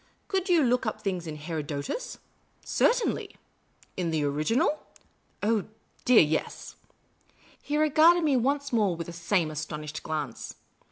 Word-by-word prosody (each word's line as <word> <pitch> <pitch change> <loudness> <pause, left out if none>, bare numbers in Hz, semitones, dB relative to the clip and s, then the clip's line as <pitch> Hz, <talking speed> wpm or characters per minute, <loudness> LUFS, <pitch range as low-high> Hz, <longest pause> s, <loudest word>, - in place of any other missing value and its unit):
Could 385 -1 -1
you 340 -4 +5
look 250 -2 +1
up 215 - -2
things 185 -4 -3
in 155 - -5
Herodotus? 150 - -4 0.2
" - - -40
" - - -29
Certainly." - - +1 0.3
" - - -32
In 175 -2 -1
the 160 -2 0
original? 155 - +1 0.2
" - - -38
" - - -24
Oh, 215 -1 +1 0.4
dear, 250 -2 +7
yes." 155 +1 -3 0.9
He 295 - -2
regarded 310 +3 +5
me 295 -3 +3
once 275 +2 0
more 205 -6 +2
with 165 0 -5
the 170 - -8
same 170 -1 0
astonished 150 0 -5
glance. 150 -6 -5
195 Hz, 160 wpm, -27 LUFS, -, 0.9 s, dear